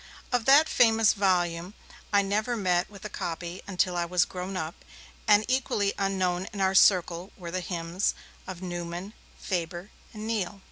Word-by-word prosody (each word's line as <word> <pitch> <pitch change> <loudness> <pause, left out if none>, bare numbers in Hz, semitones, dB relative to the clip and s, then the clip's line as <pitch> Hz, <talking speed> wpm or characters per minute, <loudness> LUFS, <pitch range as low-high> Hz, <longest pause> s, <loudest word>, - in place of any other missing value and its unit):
Of 245 -3 +1
that 290 +4 +7
famous 225 -2 +4
volume 180 -2 0 0.4
I 200 -1 +4
never 215 +5 -1
met 180 -3 +1
with 200 0 -12
a - - -1
copy 175 -2 -5
until 185 -2 0
I 175 - +1
was 180 0 +2
grown 185 +1 -5
up, 160 -1 -5 0.4
and 210 0 +5
equally 240 -6 +1
unknown 190 -2 0
in 205 - -7
our 190 0 +2
circle 180 -1 +4
were 170 -2 -7
the 185 - -1
hymns 175 +1 -2 0.3
of 185 -1 -7
Newman, 175 +2 -5 0.3
Faber 175 +1 -4 0.2
and 215 0 -7
Neale. 210 -3 -2
190 Hz, 160 wpm, -27 LUFS, 175-205 Hz, 0.4 s, that